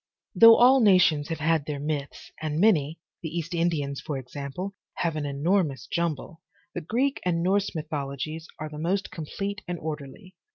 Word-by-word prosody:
Though 230 0 +9
all 260 +2 +6
nations 180 - +4
have 165 - -2
had 155 -2 +1
their 145 -2 -3
myths, 145 -1 -4
and 155 0 -2
many, 165 -7 +3 0.2
the 160 - -4
East 170 +1 -4
Indians 160 -5 -1
for 145 - -4
example, 140 +8 -6 0.2
have 165 -2 -1
an 150 -2 -2
enormous 145 - 0
jumble, 165 +2 -3 0.3
the 175 - -4
Greek 255 - 0
and 170 -2 0
Norse 195 +1 +1
mythologies 155 +1 -4
are 155 - -5
the 150 0 -8
most 185 +5 -1
complete 195 +6 -5
and 175 0 -3
orderly. 155 +4 -7
160 Hz, 165 wpm, -26 LUFS, 145-185 Hz, 0.3 s, Though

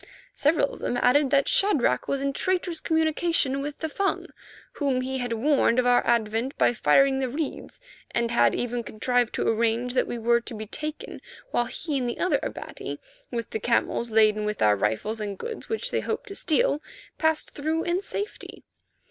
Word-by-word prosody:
Several 295 -1 +2
of - - -10
them 245 - -2
added 270 +3 +3
that 280 0 +3
Shadrach 290 - +2
was 275 0 -1
in 275 0 0
traitorous 355 0 0
communication 320 -4 +1
with 290 +1 -5
the 320 - -3
Fung, 390 +6 -1 0.5
whom 270 -4 0
he 265 +1 -3
had 245 -1 -3
warned 255 0 +2
of 255 - +3
our 245 0 +4
advent 230 +3 0
by - - +3
firing 270 +2 +3
the 260 -1 -1
reeds, 295 +4 -5 0.3
and 235 -1 -1
had 235 - +3
even 245 0 -2
contrived 240 +2 0
to - - -1
arrange 230 +2 +1
that 255 - +1
we 240 - -4
were 235 +1 +2
to 235 - -7
be 215 0 -6
taken 305 +8 -6 0.3
while 240 - +1
he 290 +2 -3
and 245 -1 -1
the - - -4
other 365 - +1
Abati, - - -6 0.3
with 235 -3 -4
the 220 - -2
camels 235 +1 0
laden 215 -1 +3
with 210 -1 -2
our 105 -1 +5
rifles 110 - -1
and 200 -2 -4
goods 465 -1 -7
which 455 +3 -1
they - - +1
hoped - - -4
to 395 - -7
steal, 325 -3 +1 0.4
passed 320 -1 +1
through 315 +3 -2
in 350 +2 0
safety. 405 +1 -6
260 Hz, 190 wpm, -26 LUFS, 235-310 Hz, 0.5 s, our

